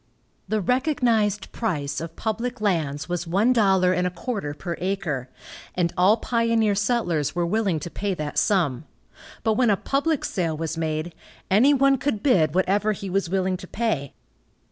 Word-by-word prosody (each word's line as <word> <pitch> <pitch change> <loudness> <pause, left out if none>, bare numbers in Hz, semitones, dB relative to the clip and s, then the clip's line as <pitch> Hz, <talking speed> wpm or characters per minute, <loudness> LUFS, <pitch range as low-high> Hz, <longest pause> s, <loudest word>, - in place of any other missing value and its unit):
The 215 +1 0
recognized 235 - +1
price 145 -11 -2
of 165 0 -7
public 230 +2 -3
lands 155 -9 -1
was 175 -1 -3
one 205 +9 +3
dollar 190 -5 +3
and 180 0 +1
a - - 0
quarter 180 - -4
per 170 +2 -5
acre, 175 -9 -2 0.5
and 175 -2 0
all 190 +5 +4
pioneer 230 -2 +1
settlers 185 - 0
were 175 -1 +1
willing 195 -3 0
to 175 - -6
pay 200 -1 -2
that 150 -3 -2
sum, 160 -9 +1 0.6
but 220 - +2
when 240 +1 +2
a 200 - +3
public 285 +5 0
sale 165 -4 -1
was 165 0 -3
made, 160 +1 -2 0.4
any 255 +9 +5
one 275 -1 +3
could 250 -7 -2
bid 165 - +3
whatever 200 +3 +2
he 195 -1 -6
was 195 -2 0
willing 185 0 0
to 185 - -10
pay. 200 - -2
190 Hz, 165 wpm, -24 LUFS, 170-225 Hz, 0.6 s, any